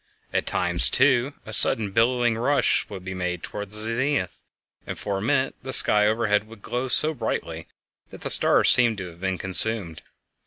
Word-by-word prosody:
At - - -2
times, - - +1
too, 130 - +1
a 110 - -7
sudden 105 -2 +2
billowing 120 +2 +1
rush 125 +3 0
would 95 -2 -10
be 95 - -6
made 90 -2 -5
toward 105 0 -7
the 105 - +2
zenith, 115 0 -1 0.5
and - - -6
for 100 -2 -4
a - - -7
minute 130 +4 -1
the 130 - -8
sky 105 -4 +5
overhead 110 -1 -1
would 110 -2 -16
glow 125 +2 -4
so 155 +5 +1
brightly 135 - -5 0.4
that - - -14
the - - -2
stars - - +4
seemed 120 -3 +3
to 90 -3 -8
have 85 +1 -20
been 95 -1 -3
consumed. 95 -2 +3
110 Hz, 185 wpm, -23 LUFS, 95-125 Hz, 0.5 s, sky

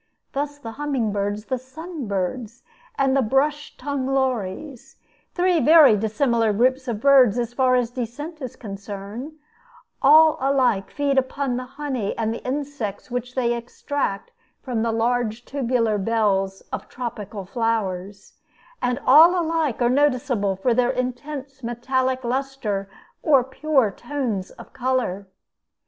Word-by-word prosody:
Thus 290 +1 -3
the 230 -6 -8
humming 270 -4 -1
birds, 205 +1 -2
the 260 -1 -2
sun 300 +2 -8
birds, 205 +4 -3 0.3
and 270 -1 +2
the 275 - +4
brush 285 +5 0
tongued 275 -1 -3
lories, 260 -1 -2 0.4
three 360 -2 +3
very 305 -4 +7
dissimilar 225 +1 +1
groups 255 +5 +1
of 230 -4 -2
birds 260 -3 +5
as 240 -1 -2
far 255 0 +3
as 245 -2 +1
descent 280 +7 -6
is 255 -3 -6
concerned, 205 +6 -7 0.7
all 310 +3 +6
alike 260 -7 +2
feed 280 -2 +1
upon 265 0 -2
the 250 +1 -4
honey 265 -9 -3
and 225 -1 0
the - - -7
insects 260 -6 -4
which 245 +1 -4
they 240 -2 +1
extract 235 -2 -3 0.3
from 245 -5 -2
the 230 0 +1
large 235 0 0
tubular 240 -6 0
bells 195 -3 0
of - - -5
tropical 215 -5 -6
flowers; 200 -3 -2 0.5
and 245 0 0
all 325 +7 +7
alike 320 -7 0
are - - +4
noticeable 250 -7 +1
for 235 +6 +1
their 245 +1 +2
intense 265 +2 -4
metallic 255 +2 -1
lustre 240 -6 -2 0.3
or 275 -5 +4
pure 265 -3 +1
tones 240 -5 -3
of - - -14
color. 245 -7 -1
250 Hz, 135 wpm, -23 LUFS, 220-275 Hz, 0.7 s, very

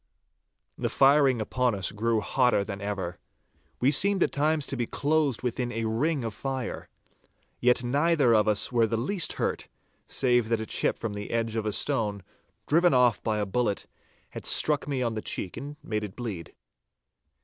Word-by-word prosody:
The - - -1
firing 135 -2 +4
upon 125 +1 0
us 95 -2 0
grew 110 +1 0
hotter 125 -2 +2
than 100 0 -7
ever. 95 -4 -4 0.6
We 130 +3 +3
seemed 195 +5 +5
at - - 0
times 150 +1 +1
to - - -2
be 120 -3 -2
closed 145 -4 0
within 125 0 -2
a 115 -1 -3
ring 130 +6 0
of 115 -2 -4
fire. 130 +2 -5 0.7
Yet 125 0 +3
neither 140 0 +2
of 110 -1 +3
us 105 -1 +2
were 115 -2 +3
the 115 - -1
least 165 - +1
hurt, - - -3 0.4
save 120 -3 +1
that 115 -1 +1
a 110 - -4
chip - - 0
from 115 -3 -4
the 105 0 -6
edge 115 -1 -1
of 110 -1 -2
a - - 0
stone, 105 -6 0 0.4
driven 170 0 +3
off 125 -3 +3
by 110 -2 -1
a 105 - -1
bullet, 105 0 -1 0.5
had - - -8
struck 150 -2 +2
me 135 -3 -1
on 115 -2 -1
the 110 - -4
cheek 90 - -3
and 145 +2 -7
made 105 -7 -3
it 100 -3 -7
bleed. 105 -9 -6
120 Hz, 180 wpm, -27 LUFS, 110-140 Hz, 0.7 s, seemed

